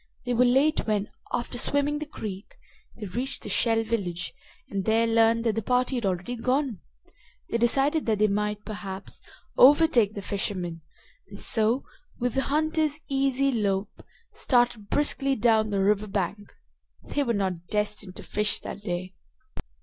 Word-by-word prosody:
They 245 - 0
were 245 +1 +4
late 270 +4 +3
when, 210 -1 0 0.2
after 245 0 -2
swimming 285 +3 +2
the 305 - -5
creek, 205 -8 -7 0.4
they 220 - -7
reached 245 +8 -3
the - - -6
Shell 225 -1 +2
village 195 -7 -3 0.3
and 195 -1 -3
there 225 +1 +3
learned 230 0 +3
that 225 -2 +1
the 225 - -1
party 250 +4 +1
had 240 -5 0
already 185 +6 -2
gone. 255 -1 0 0.7
They 235 - +1
decided 275 +6 +2
that 220 -2 +2
they 215 - +4
might, 210 +1 -2
perhaps, 195 -3 -6 0.4
overtake 260 -6 +6
the 200 - -5
fishermen, 180 -5 -3 0.5
and - - -9
so, 225 +4 +2 0.3
with 245 -1 -1
the 270 - +1
hunter's 310 +1 0
easy 275 0 +2
lope, 200 -4 -1 0.3
started 240 -5 +1
briskly 275 -2 +1
down 220 -2 +3
the 200 -2 0
river 210 +1 +2
bank. 200 +1 -3 0.5
They 290 - -2
were 240 -4 +1
not 185 -4 -2
destined 210 -2 -2
to - - -9
fish 210 0 0
that 200 - -7
day. 185 -1 -4
225 Hz, 155 wpm, -26 LUFS, 200-260 Hz, 0.7 s, overtake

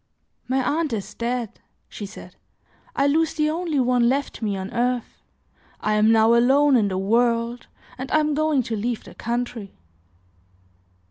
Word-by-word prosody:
"My 260 +1 +1 0.2
aunt 310 -6 -1
is 205 -3 -4
dead," 235 -2 -3 0.3
she 205 - -7
said; - - -12 0.6
"I 275 - +2
lose 315 +3 +2
the 305 0 +1
only 325 -3 -1
one 245 -1 +3
left 275 0 -2
me 205 -3 -1
on 190 0 -6
earth, 245 0 -2 0.6
I 215 - 0
am 210 +1 +4
now 225 +1 +5
alone 270 +4 +4
in 220 -4 +3
the 190 -1 -2
world 230 +4 0 0.3
and 260 - -6
I 310 - +4
am 305 -1 +1
going 305 -3 +1
to 225 - -3
leave 230 +2 -3
the - - -13
country." 235 -3 -4
245 Hz, 160 wpm, -23 LUFS, 225-280 Hz, 0.6 s, now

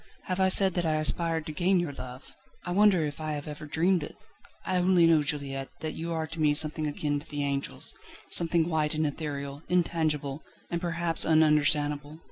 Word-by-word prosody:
Have 185 0 -3
I 190 0 +3
said 190 0 +5
that 175 - -1
I 160 -2 0
aspired 160 +1 0
to - - -5
gain 180 +4 +1
your 175 -5 -3
love? 125 0 -10 0.3
I 175 - -4
wonder 190 -3 +4
if 145 +1 -6
I 155 -1 -3
have 145 0 -6
ever 150 0 -8
dreamed 175 +4 +1
it? 150 - -8 0.5
I 185 - 0
only 180 -1 +4
know, 165 -2 +4
Juliette, 140 -2 -3
that 155 -1 -3
you 165 +1 -5
are 160 -1 -2
to 160 +1 -7
me 150 -1 +3
something 155 0 +4
akin 145 0 -2
to 145 - -13
the 145 -1 -3
angels, 140 0 -4 0.3
something 170 -1 +3
white 155 -2 0
and 155 0 0
ethereal, 140 -1 -5
intangible, 155 -5 0 0.3
and 170 0 -2
perhaps 170 -1 0
ununderstandable. 150 -1 +2
155 Hz, 195 wpm, -28 LUFS, 145-170 Hz, 0.5 s, said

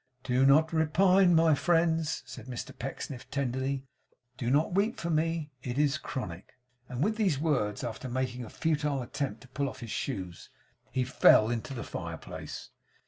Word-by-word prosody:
'Do 130 +1 +3
not 155 +3 +5
repine, 175 +3 +4
my 160 -1 +5
friends,' 165 0 +1
said 125 -1 -10
Mr 125 -2 -6
Pecksniff, 135 0 -6
tenderly. 135 0 -2 0.5
'Do 120 -1 -2
not 150 +6 +2
weep 205 +5 +1
for 170 - -2
me. 160 -1 0
It 125 0 -4
is 145 -3 +2
chronic.' 95 -8 -6 0.4
And 125 +2 -1
with 215 +3 +1
these 190 -10 +2
words, 135 -10 0
after 120 +2 -5
making 125 0 -2
a 110 - -8
futile 150 -4 0
attempt 140 +3 -4
to 130 - -14
pull 140 +1 -1
off - - -11
his 115 -2 -6
shoes, 95 -10 -4 0.4
he 130 - +1
fell 120 -3 +5
into 120 +3 -3
the 115 - -4
fireplace. - - -7
140 Hz, 165 wpm, -30 LUFS, 125-160 Hz, 0.5 s, not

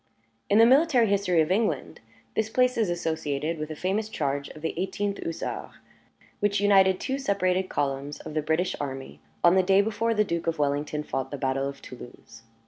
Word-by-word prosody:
In 205 - +4
the 225 - +8
military 265 -1 +5
history 195 -5 +2
of 155 +3 0
England, 190 - 0 0.4
this 220 0 0
place 250 +2 +2
is 220 -5 +1
associated 160 -2 -2
with 155 0 -4
a 155 - -5
famous 200 +6 -1
charge 140 -6 -2
of 155 - -12
the 160 - -1
Eighteenth 195 +3 -2
Hussars, 165 - -4 0.7
which 205 0 +1
united 195 -2 +4
two 265 +1 -2
separated 190 -6 0
columns 140 +1 -2
of - - -8
the 155 - 0
British 160 +4 0
army 135 - -6 0.2
on 175 - +6
the 190 - +5
day 190 +1 +4
before 220 +2 +1
the 210 - +4
Duke 170 -4 -3
of 165 0 0
Wellington 150 +1 -1
fought 135 -2 -3
the 145 - -5
battle 135 0 -1
of 140 - -11
Toulouse. 120 -2 -12
175 Hz, 190 wpm, -26 LUFS, 145-205 Hz, 0.7 s, the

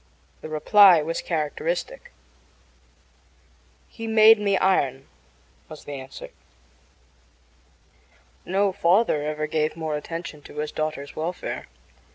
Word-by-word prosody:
The 155 - -8
reply 175 +2 +6
was 165 +2 -3
characteristic. 485 - -3 1.8
"He 225 -1 -8
made 220 0 +6
me 200 -2 +1
iron," 135 -9 0 0.6
was 155 - -11
the - - -9
answer. 135 -1 -9 2.1
No 195 +2 +1
father 185 -2 +2
ever 155 +1 -3
gave 155 0 -1
more 160 -2 -3
attention 160 0 -7
to - - -14
his 150 0 -3
daughter's 155 -2 -4
welfare. 170 +3 -5
160 Hz, 105 wpm, -24 LUFS, 150-200 Hz, 2.1 s, reply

